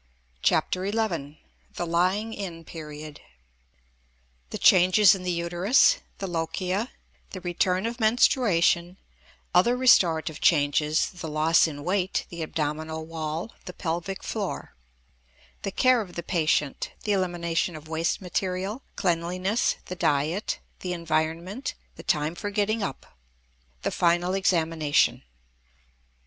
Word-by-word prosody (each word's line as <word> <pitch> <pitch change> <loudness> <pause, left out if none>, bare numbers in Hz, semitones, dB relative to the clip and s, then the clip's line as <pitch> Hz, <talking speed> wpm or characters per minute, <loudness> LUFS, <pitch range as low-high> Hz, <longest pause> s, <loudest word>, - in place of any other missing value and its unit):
CHAPTER 185 +2 +1
XI 170 -10 -2 0.4
THE 175 - -2
LYING 185 +6 +1
IN 175 -6 -6
PERIOD 150 -2 -9 1.3
The - - -4
Changes 185 +2 +6
in 190 - -4
the 180 - -3
Uterus 175 - +3 0.2
The 195 - -4
Lochia 180 +5 -2 0.4
The 185 - -8
Return 180 +2 0
of 235 +2 -3
Menstruation 195 -6 +3 0.6
Other 235 +8 +4
Restorative 165 - +3
Changes: 150 0 +2
The 180 -3 -7
Loss 155 +2 +3
in 145 -2 -7
Weight; 185 +2 0
The 170 -1 -7
Abdominal 160 0 -3
Wall; 160 +4 -4
The 180 - -7
Pelvic 175 +2 -4
Floor 205 -4 -4 0.9
The - - -2
Care 255 +4 +3
of 185 -4 -9
the 170 - -4
Patient: 155 -5 0
The 210 - -1
Elimination 175 -3 0
of 155 0 -10
Waste 165 +3 -1
Material; 190 +5 -2
Cleanliness; 180 +5 0
The 180 - -6
Diet; 155 +5 0 0.2
The 180 -1 -3
Environment; 170 - -2 0.2
The - - -10
Time 155 -2 0
for 205 +4 -5
Getting 210 +2 0
up 140 -9 -4 0.8
The - - 0
Final 175 +1 +2
Examination. 165 -6 +2
175 Hz, 120 wpm, -26 LUFS, 160-195 Hz, 1.3 s, Changes